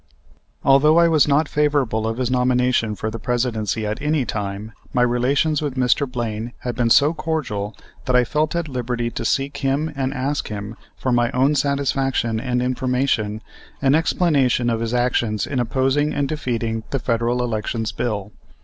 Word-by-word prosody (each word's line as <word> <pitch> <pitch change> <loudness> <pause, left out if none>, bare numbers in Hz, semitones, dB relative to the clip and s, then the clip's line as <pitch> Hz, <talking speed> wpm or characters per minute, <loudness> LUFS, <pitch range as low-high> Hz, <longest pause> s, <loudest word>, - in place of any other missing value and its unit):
Although 145 +4 +5
I 170 0 +6
was 155 -3 +4
not 145 +2 +3
favorable 135 -8 +1
to 115 - -6
his 125 -1 0
nomination 125 -3 +2
for 110 +1 -4
the 115 - -6
Presidency 115 -3 -1
at 105 +1 -3
any 150 -2 +1
time, 105 0 -4 0.2
my 125 - +3
relations 135 +5 +1
with 145 -4 -3
Mr. 130 +1 +1
Blaine 115 -1 -4
had 125 - -3
been 120 -1 +1
so 145 +6 +5
cordial 150 -11 -3 0.3
that 125 - +1
I 125 - +5
felt 150 +6 -1
at 170 -2 -1
liberty 120 -3 -2
to - - -5
seek 140 +1 0
him 145 +3 -1
and 135 -1 -1
ask 145 +1 -2
him, 105 +1 -6 0.2
for 130 - -1
my 120 -1 +2
own 135 +4 +3
satisfaction 135 -5 0
and 125 0 -1
information, 125 -4 0 0.4
an 135 -1 +3
explanation 140 -7 +2
of 115 - -1
his 115 +1 -2
action 120 -3 +1
in 130 - -2
opposing 135 +5 +1
and 140 -1 0
defeating 115 -7 -2
the 135 - -1
Federal 120 0 0
Elections 110 -1 -2
Bill. 105 -2 -3
125 Hz, 170 wpm, -21 LUFS, 115-140 Hz, 0.4 s, I